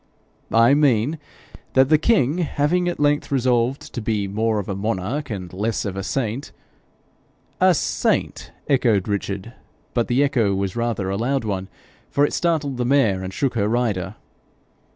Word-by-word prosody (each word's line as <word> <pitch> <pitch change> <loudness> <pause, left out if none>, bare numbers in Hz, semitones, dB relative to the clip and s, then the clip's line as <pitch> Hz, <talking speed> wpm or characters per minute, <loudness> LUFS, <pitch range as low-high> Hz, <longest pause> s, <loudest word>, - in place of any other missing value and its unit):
'I 115 +4 +5
mean 145 0 +2 0.5
that, 130 0 +4
the 155 -1 +5
king 170 - +2
having 175 +2 +1
at 175 - -2
length 145 0 +1
resolved 125 0 0
to 120 - -4
be 105 -2 -1
more 110 +2 0
of 100 - -3
a 100 - -2
monarch 110 +8 -2
and 95 -5 -6
less 110 +5 -2
of 100 -2 -3
a 95 - -3
saint 110 +6 -3 0.5
' - - -34
'A - - +5
saint!' - - -1 0.2
echoed 120 -8 +2
Richard, 100 +2 -3 0.4
but 120 -2 +1
the 125 +3 +2
echo 115 -9 +1
was 95 -1 -2
rather 115 -5 -1
a 100 - -1
loud 130 +4 0
one, 95 -3 -3 0.4
for 145 - +3
it - - -3
startled 150 -6 0
his 120 - 0
mare 115 -9 +3
and 95 0 -5
shook 135 +6 -1
her 105 -3 0
rider. 110 -5 -1
115 Hz, 170 wpm, -22 LUFS, 100-140 Hz, 0.5 s, I